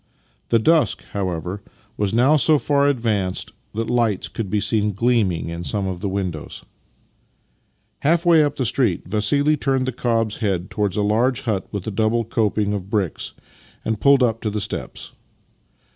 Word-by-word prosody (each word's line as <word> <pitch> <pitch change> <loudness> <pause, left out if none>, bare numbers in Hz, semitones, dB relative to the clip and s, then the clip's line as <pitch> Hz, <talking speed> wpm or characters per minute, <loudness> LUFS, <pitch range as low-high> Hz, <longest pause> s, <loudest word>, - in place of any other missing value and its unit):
The 115 - +4
dusk, 160 +8 +2
however, 95 0 -3 0.3
was 105 -3 -1
now 125 +7 +4
so 155 +1 +4
far 140 0 +2
ad 140 - +1
vanced 105 -6 -1 0.2
that 115 +1 -2
lights 115 -5 +1
could 110 -4 -5
be 105 - +1
seen 105 0 +1
gleaming 105 -7 +1
in 85 +1 -5
some 100 +2 -1
of 95 -2 -3
the 100 - -1
windows. 90 -6 -4 1.3
Half 165 +4 +2
way 165 -3 +6
up 145 -1 -1
the 130 - -1
street 115 -7 +1
Vassili 140 +10 +2
turned 135 -2 0
the 130 - -1
cob's 115 -3 0
head 95 -5 -2
towards 105 -3 -1
a 105 - +1
large 120 +5 +1
hut 110 -8 -2
with 100 -3 -4
a 110 - -3
double 110 +3 +1
coping 105 -2 0
of 100 -2 -5
bricks, 100 -7 -2 0.5
and 110 -1 -2
pulled 140 -2 +5
up 115 -2 0
at 105 - -1
the 105 - -1
steps. - - -5
110 Hz, 175 wpm, -21 LUFS, 100-125 Hz, 1.3 s, way